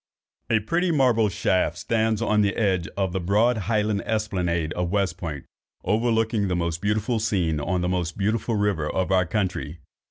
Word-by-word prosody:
A 110 - +3
pretty 175 - 0
marble 125 -8 +3
shaft 90 -3 0
stands 110 +4 0
on 105 -2 +2
the 100 -1 +1
edge 95 -6 +1
of 95 -2 0
the 95 - 0
broad 105 +7 +2
highland 105 -2 +1
esplanade 90 -7 -1
of 90 -1 -2
West 95 -3 0
Point, 80 -7 -6 0.4
overlooking 110 0 +1
the 90 - 0
most 85 -1 -2
beautiful 105 +3 0
scene 90 -8 0
on 90 +5 -1
the 90 - 0
most 90 -2 -2
beautiful 110 +3 0
river 100 -7 0
of 95 0 -1
our 90 -1 +3
country. 90 -4 -2
100 Hz, 170 wpm, -24 LUFS, 90-110 Hz, 0.4 s, A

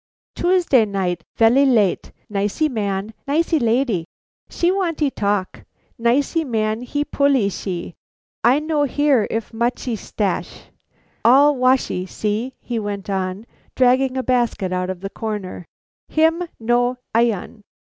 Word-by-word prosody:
"Tuesday 350 -9 +3
night, 185 -5 -2
velly 235 +5 +5
late; 225 -9 +2 0.2
nicee 205 +8 0
man, 205 -4 -3
nicee 320 +2 +1
lalee. 230 -7 +1 0.4
She 345 +1 +1
wantee 335 -7 0
talk. 200 -4 -2 0.4
Nicee 275 +8 +1
man 220 -4 -1
he 290 +4 -2
pullee 280 -8 +2
she; 180 -2 -5 0.5
I 245 +4 +5
no 310 -1 0
hear 280 -4 +2
if 225 +1 -4
muchee 235 +1 -1
stasch. 205 -1 -4 0.5
All 280 +5 +6
washee, 255 -7 +1
see!" 220 +6 -3
he 235 -2 -3
went 205 -1 -4
on, 190 +2 -3 0.3
dragging 255 +1 +3
a 260 - -1
basket 235 -7 0
out 180 0 -1
of 185 -1 -5
the 195 - -4
corner, 210 -5 -5 0.4
"him 325 +3 +2
no 245 +2 +1 0.2
ilon." 230 -2 0
235 Hz, 125 wpm, -20 LUFS, 205-275 Hz, 0.5 s, All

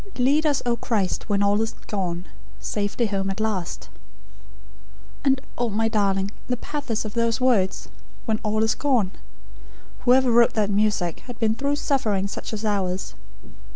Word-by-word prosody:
"'Lead 285 +5 +3
us, 285 -2 +1
O 240 -1 +2
Christ, 220 -4 -1
when 200 -1 +2
all 205 +1 +3
is 225 0 -1
gone, 180 -3 -3 0.3
Safe 205 -1 -2
home 200 -4 +1
at 195 - -3
last.'" 210 -5 -2 1.4
"And 270 -1 +3 0.2
oh, 240 -1 +1
my 225 +2 +1
darling, 200 -2 +1 0.2
the 250 - -1
pathos 245 -5 -3
of 210 - -5
those 230 0 +1
words, 235 -8 +2 0.4
'when 220 -2 0
all 215 +1 +1
is 220 - +3
gone'! 245 -10 +1 0.9
Whoever 255 0 +4
wrote 235 0 +5
that 210 -2 +1
music, 200 -5 +1
had 245 - -7
been 220 -2 +2
through 280 +5 0
suffering 225 -10 0
such 200 - -5
as 220 0 -4
ours. 190 -3 -1
220 Hz, 155 wpm, -24 LUFS, 200-245 Hz, 1.4 s, wrote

